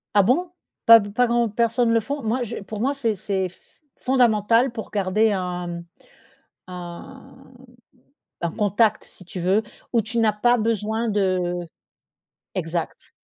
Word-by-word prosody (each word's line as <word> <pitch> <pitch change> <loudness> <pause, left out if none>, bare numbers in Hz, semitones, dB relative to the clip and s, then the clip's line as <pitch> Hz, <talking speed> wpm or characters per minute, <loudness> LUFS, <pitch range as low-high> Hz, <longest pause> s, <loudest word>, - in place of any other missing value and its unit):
Ah 200 - +6
bon? 340 - +1 0.3
Pas 230 0 +10
b 205 -1 -5
pas 245 +2 +3
grand 235 0 +2
personne 230 +2 +1
le 230 - +4
font? 285 +4 -4
Moi 240 +3 0
je 235 0 -5
pour 210 +1 -6
moi 275 +3 +1
c'est 230 -6 -1
c'est 190 -1 -2
f 185 - -26 0.2
fondamental 235 -1 +3
pour 225 -2 -7
garder 210 +2 +2
un, 180 -2 -3
mmh, 170 0 -6 0.8
un 180 +8 -10 1.1
un 170 - 0
contact, 210 +1 +1
si 185 - -12
tu 180 - -7
veux, 190 +5 +2 0.3
où 230 - +4
tu 230 +3 -2
n'as 215 -2 +3
pas 240 +3 +3
besoin 220 +1 -1
de 185 -3 0 1.0
exact! 170 -2 -4
215 Hz, 155 wpm, -23 LUFS, 185-235 Hz, 1.1 s, Pas